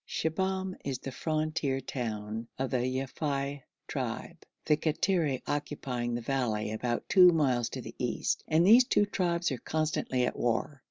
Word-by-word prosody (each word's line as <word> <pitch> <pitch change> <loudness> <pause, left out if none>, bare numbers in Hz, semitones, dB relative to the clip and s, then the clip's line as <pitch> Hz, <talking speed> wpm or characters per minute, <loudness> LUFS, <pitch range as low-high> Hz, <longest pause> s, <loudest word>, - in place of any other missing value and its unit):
Shibahm 190 +3 -1
is 135 -2 -2
the 135 - -7
frontier 155 -1 -1
town 110 -3 -4
of 130 0 -2
the 130 - +2
Yafei 135 +2 -2 0.3
tribe, - - -4 0.3
the 150 - +4
Kattiri 155 -2 0
occupying 135 -5 -2
the 120 - -3
valley 115 -4 -1
about 120 +2 -2
two 180 -2 +8
miles 130 -7 +2
to - - -5
the - - -8
east, - - -1
and 160 +2 +4
these 235 +6 +8
two 205 - +3
tribes 175 -4 0
are 130 - -3
constantly 155 -5 0
at - - -2
war. 120 +4 -1
140 Hz, 155 wpm, -30 LUFS, 125-160 Hz, 0.3 s, two